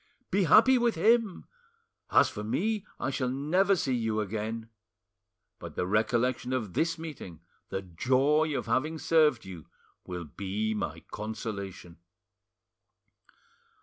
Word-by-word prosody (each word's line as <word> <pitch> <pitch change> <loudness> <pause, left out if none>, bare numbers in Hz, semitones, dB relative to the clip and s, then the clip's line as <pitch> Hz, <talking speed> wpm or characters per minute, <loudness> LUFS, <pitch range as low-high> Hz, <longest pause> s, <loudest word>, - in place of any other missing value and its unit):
Be 195 0 +2
happy 230 - +6
with 235 -3 +2
him! 220 +3 +2 0.6
As - - +5
for 105 - -6
me, 210 - -1
I 130 - -1
shall 130 -2 -1
never 175 +9 +2
see 135 -7 -1
you 110 -3 0
again; 110 +2 -3 0.9
but - - -9
the - - -1
recollection 120 +5 0
of 110 -8 -2
this 165 - 0
meeting, 145 - -8 0.3
the 95 - -3
joy 135 - +1
of - - -4
having 155 +5 0
served 155 -7 +3
you, 90 -4 -10 0.4
will 90 -1 -5
be 100 +7 -3
my 105 - -4
consolation." 100 -5 -6
125 Hz, 125 wpm, -29 LUFS, 105-160 Hz, 0.9 s, happy